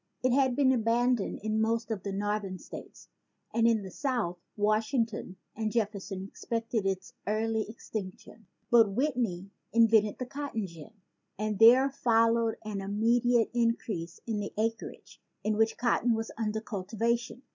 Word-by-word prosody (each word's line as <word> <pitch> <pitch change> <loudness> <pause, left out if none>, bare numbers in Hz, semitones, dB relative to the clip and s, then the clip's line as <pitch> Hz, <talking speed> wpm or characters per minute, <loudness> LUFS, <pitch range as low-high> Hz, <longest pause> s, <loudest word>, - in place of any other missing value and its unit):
It 255 - +3
had 260 -2 +3
been 270 -1 +4
abandoned 240 -1 +1
in 215 0 0
most 225 +1 0
of 210 -4 -2
the 200 - -4
northern 205 -1 -2
states; - - -11 0.5
and 230 0 +3
in 225 -3 +2
the 190 - -8
South 230 -9 -2 0.2
Washington 215 -1 0 0.2
and 220 0 -2
Jef 215 -3 +1
ferson 195 -2 -6
expected 230 -1 -2
its 190 0 -3
early 220 +1 0
extinction. 215 -1 -8 0.2
But 230 -3 +7
Whit 275 +5 +1
ney 195 -6 -2 0.2
invented 225 -2 +4
the 255 - -4
cotton 270 -5 -4
gin 170 +4 -11 0.4
and 210 0 -2
there 245 +4 +8
followed 230 -2 +2
an 205 -2 -3
immediate 230 +4 +2
increase 225 -7 -1
in 220 -3 -2
the 205 - -4
acreage 225 +1 -4 0.2
in 215 0 +1
which 225 +1 +2
cotton 240 0 +2
was 225 0 -4
under 220 -1 -2
cultivation. 230 +4 -2
225 Hz, 150 wpm, -29 LUFS, 205-235 Hz, 0.5 s, there